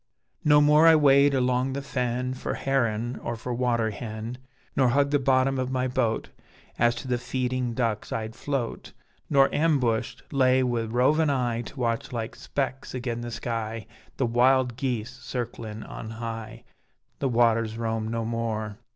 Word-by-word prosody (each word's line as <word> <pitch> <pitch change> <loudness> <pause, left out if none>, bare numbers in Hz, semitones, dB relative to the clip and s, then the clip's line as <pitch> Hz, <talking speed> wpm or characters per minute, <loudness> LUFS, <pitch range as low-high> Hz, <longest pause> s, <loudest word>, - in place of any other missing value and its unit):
No 150 -1 +6
more 150 +2 +6
I 165 - +8
wade 140 -1 +5
along 125 +1 +1
the 140 - -3
fen 125 -1 -2
For 130 - -4
heron 120 -3 0
or 120 - -3
for 120 +2 -5
water 120 -2 +1
hen, 110 +3 -6 0.4
Nor 130 - +4
hug 140 +3 +2
the 145 - +3
bottom 130 0 +2
of 130 0 -1
my 130 0 0
boat 120 -3 -1 0.5
As 120 0 +4
to 125 - -7
the 125 -1 0
feeding 125 -1 -2
ducks 115 -4 -1
I'd 110 0 -3
float; 135 -5 -3 0.4
Nor 135 -2 +5
ambushed 140 -8 +1
laay 130 -1 +4
wi' 120 -2 0
rovin' 130 +7 +2
eye 120 -4 0
To 125 +4 -10
watch 115 -2 -1
like 115 -2 -4
specks 135 -2 -4
agen 120 -2 -3
the 120 - -5
sky 115 -1 -4 0.3
The 135 - +1
wild 125 +1 +3
geese 120 -3 -2
circlin' 115 -4 -5
on 110 - -8
high: 115 0 -6 0.6
The 135 - 0
waters 115 -2 +2
roam 110 -1 -2
no 115 0 -2
more. 110 -2 -3
125 Hz, 160 wpm, -26 LUFS, 115-130 Hz, 0.6 s, I